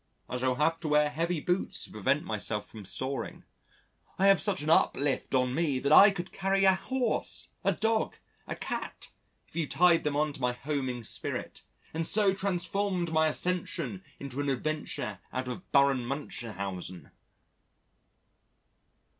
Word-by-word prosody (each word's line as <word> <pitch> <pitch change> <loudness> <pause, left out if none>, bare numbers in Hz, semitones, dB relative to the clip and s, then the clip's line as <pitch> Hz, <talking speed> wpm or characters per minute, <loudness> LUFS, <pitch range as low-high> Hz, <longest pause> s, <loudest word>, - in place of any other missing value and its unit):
I 125 - -3
shall 130 0 +1
have 160 +4 +1
to 165 - -5
wear 150 0 +3
heavy 165 +3 -1
boots 180 +5 -1
to - - -10
prevent 130 +8 +1
myself 105 -1 -2
from 105 -3 -10
soaring. 130 +9 -2 0.7
I 190 - +2
have 195 - +5
such 195 -7 0
an 155 - -2
uplift 140 -3 +2
on 125 -1 +2
me 150 -3 +1
that 140 +3 -1
I 200 +7 +10
could 185 -2 -5
carry 195 0 +1
a 190 - +7
horse, 255 +6 0
a - - +3
dog, 225 0 0 0.3
a - - -3
cat, - - -5 0.4
if - - -21
you 165 -3 0
tied 175 -1 +4
them 150 -1 -1
on 150 0 +1
to 135 - -11
my 125 0 +1
homing 130 -3 -3
spirit - - -5 0.3
and 165 +1 -1
so 205 -2 +3
transformed 190 -2 -1
my 160 0 +4
Ascension 155 - -2 0.2
into 140 -1 -6
an 145 - -1
adventure 145 +1 -3
out 130 0 -3
of 125 +9 -7
Baron 140 -3 +4
Munchausen." 100 - -5
150 Hz, 155 wpm, -30 LUFS, 130-180 Hz, 0.7 s, I